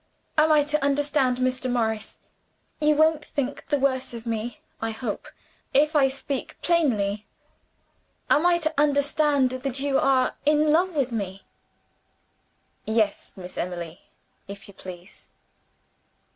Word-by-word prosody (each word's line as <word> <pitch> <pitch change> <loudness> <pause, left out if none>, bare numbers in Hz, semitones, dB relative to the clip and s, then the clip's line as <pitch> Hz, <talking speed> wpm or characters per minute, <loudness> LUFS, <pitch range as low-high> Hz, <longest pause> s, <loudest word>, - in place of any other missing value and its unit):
Am 310 0 +4
I 300 -1 +5
to 300 0 -1
understand, 280 -2 +2
Mr. 255 0 0
Morris 220 -3 -1 0.6
you 300 0 +3
won't 315 0 +3
think 280 0 -4
the 290 - +1
worse 260 -2 0
of 230 0 -8
me, 230 +1 -3 0.2
I 225 - -1
hope, 225 -1 -4 0.5
if 300 +3 +4
I 280 -2 +5
speak 270 0 -4
plainly 215 -12 +1 1.0
am 300 - +4
I 350 -1 +4
to 315 -2 -1
understand 285 -2 +3
that 255 0 -3
you 275 -1 +1
are 260 -2 +2
in 300 +1 +3
love 350 +2 +2
with 265 -4 0
me?" 195 -4 -4 1.4
"Yes, 220 -3 -1
Miss 180 -1 -7
Emily 175 -2 -5 0.5
if 200 0 -10
you 200 - -13
please." 185 0 -11
265 Hz, 130 wpm, -25 LUFS, 225-295 Hz, 1.4 s, I